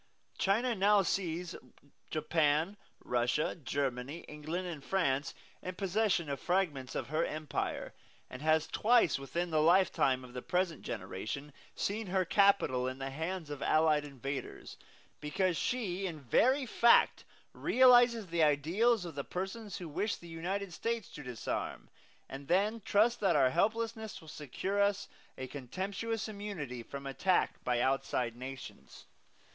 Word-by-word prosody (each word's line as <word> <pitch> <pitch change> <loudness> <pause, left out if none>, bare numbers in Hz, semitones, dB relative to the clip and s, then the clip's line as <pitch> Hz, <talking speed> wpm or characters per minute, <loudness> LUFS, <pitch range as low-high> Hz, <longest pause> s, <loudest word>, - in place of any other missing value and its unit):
China 230 +6 +2
now 200 0 +4
sees 175 -1 -2 0.6
Japan, 155 +3 +1 0.3
Russia, 125 +5 +1
Germany, 135 0 -3
England 155 +5 -5
and 155 -5 -6
France 145 -7 0 0.3
in 185 0 -5
possession 195 -3 +1
of 140 -2 -3
fragments 160 -9 -1
of - - -3
her 155 +2 +1
empire, 155 -3 -3 0.3
and 125 - -9
has 155 0 +3
twice 230 - +3
within 170 +5 -3
the 155 -1 +3
lifetime 165 -6 +3
of 125 -1 -12
the 125 - -5
present 180 -1 -1
generation 140 +9 -5 0.2
seen 215 +1 -2
her 185 0 +1
capital 185 -11 +3
in 130 0 -4
the 135 0 -4
hands 160 +2 -4
of 145 - -6
allied 155 -1 +3
invaders, 140 -1 -6 0.4
because 175 +4 0
she 195 - -1
in 165 -4 -6
very 255 - +3
fact 235 0 +4 0.3
realizes 245 -3 +5
the 170 -2 -1
ideals 175 - +3
of 170 - -6
the 140 0 -4
persons 195 +6 -5
who 175 - -6
wish 200 +8 -1
the 170 - -13
United 180 +3 -4
States 230 +1 -2
to - - -8
disarm, 125 -4 -4 0.4
and 135 +1 -8
then 205 +6 +2
trust 225 +5 +3
that 190 -5 +2
our 130 -3 +4
helplessness 220 - -1
will 160 - -15
secure 170 +7 -3
us 200 0 +1 0.3
a 130 - -4
contemptuous 195 - -4
immunity 200 - -5
from 140 +4 -8
attack 180 +7 0
by 125 -1 +1
outside 125 -2 0
nations. 130 +1 -9
170 Hz, 140 wpm, -32 LUFS, 140-200 Hz, 0.6 s, realizes